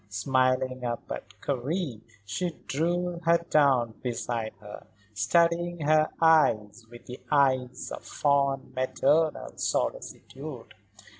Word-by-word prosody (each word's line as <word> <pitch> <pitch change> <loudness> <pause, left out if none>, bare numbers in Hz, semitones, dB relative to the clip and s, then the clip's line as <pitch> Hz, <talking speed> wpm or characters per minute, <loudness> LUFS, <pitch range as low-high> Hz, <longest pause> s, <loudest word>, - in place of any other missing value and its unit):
Smiling 130 +3 0
up 120 -1 -3
at 105 0 -7
Karen 140 - -2 0.2
she 180 - -2 0.2
drew 175 +4 -1
her 170 +1 +5
down 135 -6 +4
beside 120 -2 -3
her, 105 0 -11 0.3
studying 170 - +1
her 155 +1 +3 0.8
with 120 0 -14 0.2
eyes 130 -3 +1
of - - -7
fond, 140 -1 0
maternal 145 +4 +1
solicitude. 135 -3 -4
135 Hz, 95 wpm, -27 LUFS, 125-155 Hz, 0.8 s, her